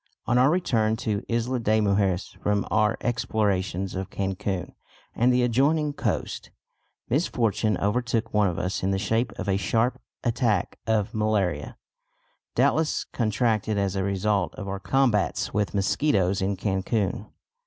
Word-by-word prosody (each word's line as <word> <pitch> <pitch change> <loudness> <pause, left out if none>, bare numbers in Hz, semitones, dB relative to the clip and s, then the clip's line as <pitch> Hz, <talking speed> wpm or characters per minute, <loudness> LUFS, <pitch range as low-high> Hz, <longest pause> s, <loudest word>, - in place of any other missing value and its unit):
On 120 - +1
our 130 +2 +5
return 115 -11 +1
to 105 -1 -2
Isla 120 +2 0
de 110 -1 +2
Mujeres 100 -3 +1
from 105 -1 +1
our 105 0 +2
explorations 100 -6 -1
of 95 0 -4
Cancun 95 -1 -3 0.4
and 125 +2 +3
the 125 0 +3
adjoining 145 +5 +2
coast, - - -3 0.6
misfortune 115 - +1
overtook 115 +2 -1
one 105 -1 +4
of 85 - -2
us 90 +2 -2
in 95 - 0
the 95 - +1
shape 110 +4 0
of - - -5
a 95 -1 +2
sharp 115 +5 0 0.2
attack 115 -5 0
of 110 -2 +1
malaria, 100 -9 0 0.8
doubtless 150 +5 +2
contracted 110 -2 0
as 100 -1 0
a 95 - 0
result 100 -1 0
of 100 - -7
our 95 0 -3
combats 120 -2 +1
with 105 -4 -1
mosquitoes 100 -2 +1
in 95 +1 0
Cancun. 100 +1 -1
105 Hz, 145 wpm, -25 LUFS, 95-120 Hz, 0.8 s, our